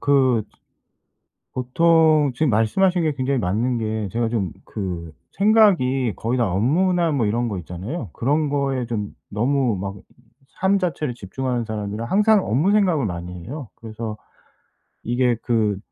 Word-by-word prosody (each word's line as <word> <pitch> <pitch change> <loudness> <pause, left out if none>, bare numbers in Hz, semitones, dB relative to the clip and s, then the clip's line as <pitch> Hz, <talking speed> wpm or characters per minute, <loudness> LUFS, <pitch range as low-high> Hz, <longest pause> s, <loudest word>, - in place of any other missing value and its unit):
그 130 -5 +3 1.1
보통 155 +2 +3
지금 155 +3 +1
말씀하신 175 - +2
게 155 -2 +1
굉장히 135 0 -1
맞는 115 +6 0
게 110 -2 -2
제가 115 0 0
좀 100 -7 -2
그 85 -5 -5 0.2
생각이 180 - +3
거의 120 +3 -1
다 115 -5 +1
업무나 165 - +2
뭐 130 -6 +1
이런 120 +3 0
거 100 -4 -3
있잖아요. 95 - -6
그런 145 +4 +1
거에 135 -3 -1
좀 105 -4 -4 0.2
너무 120 +1 +1
막 100 +1 -5 0.6
삶 195 +1 +3
자체를 155 -8 -2
집중하는 120 +4 -3
사람이라 105 0 -4
항상 210 - +3
업무 150 - +2
생각을 185 - +3
많이 90 -2 -5
해요. 140 -2 -7
그래서 110 -1 -6 0.9
이게 120 0 +1
그 110 -5 +1
125 Hz, 280 characters per minute, -22 LUFS, 110-150 Hz, 1.1 s, 그